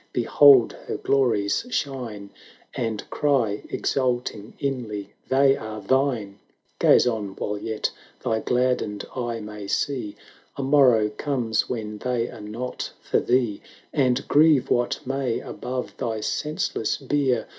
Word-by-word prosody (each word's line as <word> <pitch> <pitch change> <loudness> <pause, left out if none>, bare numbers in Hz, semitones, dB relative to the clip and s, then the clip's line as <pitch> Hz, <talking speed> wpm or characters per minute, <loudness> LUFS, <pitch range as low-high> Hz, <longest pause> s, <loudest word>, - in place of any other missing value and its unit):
behold 130 +1 +6
her - - -2
glories 120 - +1
shine, 120 - -4 0.4
And 110 -3 -3
cry, 125 -8 +1
exulting 120 -5 -1
inly, 120 -7 -4 0.2
"They 135 +1 +5
are 110 -1 -6
thine 110 -3 0 0.2
!" - - -43
Gaze - - +6
on, 105 -5 -2
while 105 0 -3
yet 110 0 -2 0.3
thy 115 -3 +1
gladdened 125 -4 0
eye 120 -2 -2
may 105 -1 -8
see, 125 -3 -1 0.2
— - - -30
A 140 - -2
morrow 130 -6 +5
comes 115 -1 -1
when 105 -3 -4
they 120 -1 -1
are 115 - -10
not 115 +5 -5
for - - +1
thee: 120 -5 +1 0.3
And 130 -3 +1
grieve 150 -2 +4
what 120 0 0
may 135 -2 -1
above 125 0 -5
thy 115 -4 -2
senseless 150 -4 -1
bier. 135 -3 0
120 Hz, 135 wpm, -24 LUFS, 105-135 Hz, 0.4 s, behold